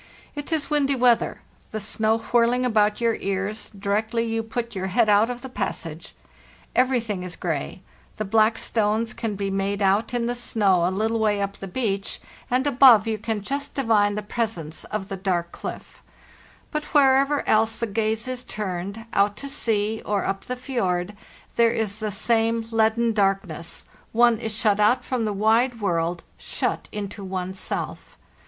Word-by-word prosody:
It 290 +1 -6
is 310 -2 -1
windy 280 -2 +2
weather, 245 -2 +2 0.3
the 215 - -4
snow 220 +1 +1
whirling 240 +2 +2
about 215 -3 +2
your 230 -1 +1
ears, 195 +2 -2
directly 215 +3 -1
you 225 0 -1
put 235 +1 -4
your 190 -1 -3
head 215 +4 +2
out 210 +3 +5
of 245 -1 -5
the - - -5
passage. 165 -9 -5 0.6
Everything 235 -6 +1
is 180 -1 -4
gray; 170 +2 -4 0.3
the 215 - -2
black 220 +2 +3
stones 220 0 0
can 220 -3 -3
be 195 0 -2
made 195 +1 -1
out 200 +2 +2
in 235 -1 0
the 240 - 0
snow 200 -7 +2
a - - +2
little 220 +4 0
way 210 -2 +2
up 200 0 -3
the 195 - -7
beach, 200 -2 -2 0.3
and 255 +2 +1
above 255 -6 +7
you 220 -1 -2
can 220 -1 -3
just 280 +5 -4
divine 215 -6 +2
the 210 - -3
presence 205 -9 -3
of 210 -2 -4
the 195 - -5
dark 175 -3 -1
clit; - - -6 0.9
but 300 0 -2
wherever 275 +1 +4
else 220 +1 +3
the 230 - 0
gaze 220 +2 -1
is 255 -1 -3
turned, 200 0 -5
out 200 +1 +2
to 280 - -6
sea 220 -6 0
or 205 -1 -1
up 195 0 -3
the 250 - -3
fjord, 205 -7 -2 0.4
there 230 -1 +5
is 220 -3 -2
the 215 -1 -2
same 225 +2 +1
leaden 225 +1 +2
darkness; 195 -5 -1 0.3
one 235 -1 +4
is 225 -1 -3
shut 210 -3 +2
out 215 +5 +3
from 250 -3 -1
the 210 - 0
wide 225 +4 +2
world, 170 -3 -1 0.2
shut - - -2
into 205 -1 -5
one's 185 0 -4
self. - - -4
220 Hz, 175 wpm, -24 LUFS, 200-235 Hz, 0.9 s, above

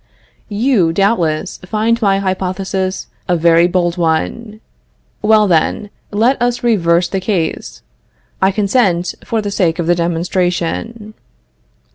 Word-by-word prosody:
You, 210 -5 +2
doubtless, 175 -4 0
find 220 +5 0
my 195 -2 +3
hypothesis 190 0 -2 0.2
a 175 -2 +2
very 170 +1 +4
bold 175 -1 0
one. 195 +7 -2 0.6
Well, 215 0 +4
then, 185 +4 0 0.2
let 235 +5 +1
us 245 0 0
reverse 175 -7 +2
the 195 - -2
case. 185 -4 -3 0.6
I 190 - +4
consent 195 -3 +1
for 225 -2 -2
the 205 - -3
sake 175 -5 0
of 170 - -2
the 175 - +3
demonstration. 175 +5 -2
190 Hz, 120 wpm, -16 LUFS, 175-215 Hz, 0.6 s, very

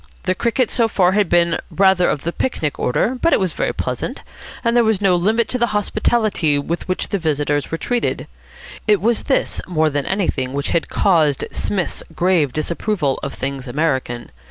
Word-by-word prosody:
The 185 - +1
cricket 235 +4 0
so 230 -2 +3
far 185 -4 +2
had 205 -1 +2
been 170 -1 +3
rather 190 -2 +3
of 145 - -2
the 170 - -1
picnic 155 - -2
order, 240 - 0
but 335 - +3
it - - +4
was 185 -4 0
very - - -1
pleasant; - - -4 0.4
and 235 -1 +1
there 240 - +5
was 220 -3 +2
no 195 -3 +3
limit 215 +6 +2
to 250 - -1
the 240 - +3
hospitality 205 -7 +1
with 165 +4 -3
which 185 - -2
the 200 - -1
visitors 145 -3 0
were 165 - -2
treated. 245 +7 -1 0.6
It 210 -2 +4
was 230 +2 0
this 270 - 0
more 160 -3 +1
than 145 -1 -2
anything 150 -10 -1
which 140 0 -2
had 170 - 0
caused 155 -8 +2
Psmith's 190 -4 -2
grave 175 -6 +2
disapproval 155 - -1
of 140 - -5
things 135 0 -4
American. 130 -4 -2
175 Hz, 185 wpm, -19 LUFS, 150-210 Hz, 0.6 s, there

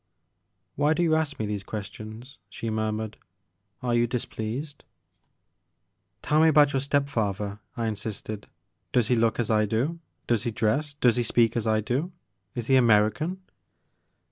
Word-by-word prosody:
"Why 150 +3 +3
do 175 - +1
you 165 -2 +3
ask 155 -2 0
me 110 - -2
these 105 -1 -3
questions, 110 +5 -8
she 115 - -4
murmured; 110 0 -2 0.3
" 95 +2 -34
are 120 -1 0
you 120 0 +3
displeased? 125 +4 -4 1.4
"Tell 150 +1 +3
me 160 - +6
about 150 -2 +5
your 135 - +2
step 140 +1 +1
father, 105 -5 -2 0.2
I 115 - -1
insisted. 105 -1 -4 0.2
" - - -50
Does 120 -3 +3
he 125 - +4
look 115 0 +2
as 115 -2 0
I 105 -1 +3
do? 130 +11 -1 0.3
Does 115 -3 +1
he - - -1
dress, 120 +7 0
does 125 -4 +3
he 120 - +2
speak 115 -1 +2
as 115 -2 -1
I 110 0 +3
do? 135 - -1 0.4
Is 120 - -3
he 130 +2 +5
American 120 - +3
115 Hz, 170 wpm, -26 LUFS, 110-140 Hz, 1.4 s, me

